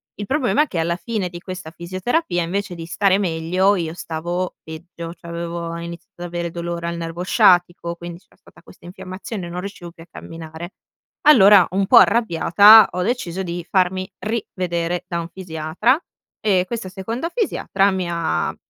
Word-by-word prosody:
Il 205 - -6
problema 290 +2 +2
è - - -5
che 180 - -6
alla 170 +1 0
fine 210 -2 -3
di 175 0 -9
questa 185 -3 -8
fisioterapia 180 - -2
invece 185 +2 -3
di 165 -1 -7
stare 195 +3 +2
meglio, 185 +2 +1
io 165 -4 -3
stavo 175 +2 -4
peggio, 165 +1 -9
cioè 170 -1 -11
avevo 170 0 -4
iniziato 170 +1 -9
ad 175 - -4
avere 170 0 -4
dolore 170 0 -4
al 170 0 -3
nervo 165 +1 -5
sciatico 175 -2 +3
quindi 170 0 -9
c'era 190 - -29
stata - - -21
questa 170 - -18
infiammazione, 185 +1 -7
non 175 +1 -5
riuscivo 190 -3 -8
più 165 -1 -14
a - - -20
camminare. 165 +2 -9 0.5
Allora 205 - +7
un 195 +1 0
po' - - +7
arrabbiata 205 0 +6
ho 180 - -3
deciso 190 -5 -2
di 175 -1 -5
farmi 185 0 +1
rivedere 180 -5 -3
da 170 -1 -2
un 165 - -8
fisiatra 175 - 0 0.4
e 190 -4 +2
questa 225 -4 -5
seconda 225 - -4
fisiatra 210 - +1
mi 185 -2 -2
ha, 80 - -1
175 Hz, 170 wpm, -21 LUFS, 170-195 Hz, 0.5 s, Allora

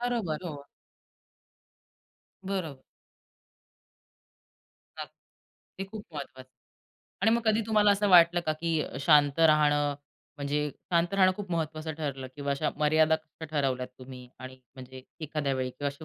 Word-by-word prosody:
बरोबर, 230 -11 -1
हो. 145 -5 -7 1.8
बरोबर. 185 -8 -4 2.2
नक्क - - -6 0.7
ते 195 - -3
खूप 215 -2 -8
महत्त्वाचं 130 -3 -8
आहे 125 - -59 0.7
आणि 220 - +5
मग 235 - -3
कधी 220 0 +3
तुम्हाला 210 -2 +4
असं 205 +1 +2
वाटलं 175 -1 +6
का, 155 - +2
की 160 0 -1
अ, - - -7
शांत 145 -2 +5
राहणं 145 -1 +2 0.4
म्हणजे 145 +1 -1 0.2
शांत 170 +2 +2
राहणं 185 -1 +5
खूप 200 -3 -7
महत्त्वाचं 160 -1 -3
ठरलं 135 -4 -4
किंवा 140 -1 -3
अशा 150 +2 -1
मर्यादा 155 +1 +3 0.2
कशा - - -4
ठरवल्यात 135 -4 -1
तुम्ही, 130 -1 -11
आणि 130 0 -10 0.2
म्हणजे 130 0 -11 0.2
एखाद्या 145 -2 -1
वेळी 130 -1 -2
किंवा 140 +3 -3
असे 140 +2 -10
150 Hz, 140 wpm, -28 LUFS, 140-175 Hz, 2.2 s, वाटलं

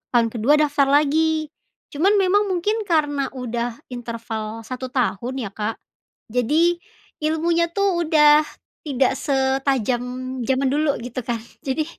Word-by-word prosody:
tahun 230 -1 +4
ke-2 240 +5 +2
daftar 285 -2 +2
lagi. 310 +2 +2 0.4
Cuman 370 +8 +2
memang 400 +1 +3
mungkin 410 +4 -1
karena 295 -4 +1
udah 240 -1 -3 0.2
interval 225 -2 -5
1 255 +2 -6
tahun 245 0 0
ya 200 - -4
Kak, 215 +2 -3 0.6
jadi 320 +9 +2 0.4
ilmunya 330 +2 +1
tuh 400 0 +2 0.2
udah 300 -1 +5 0.4
tidak 265 -1 +2
setajam 265 -3 0 0.4
zaman 265 0 +1
dulu 295 0 +1
gitu 245 +1 -5
kan. 235 -1 -1 0.3
Jadi 305 +4 0
275 Hz, 125 wpm, -22 LUFS, 245-315 Hz, 0.6 s, udah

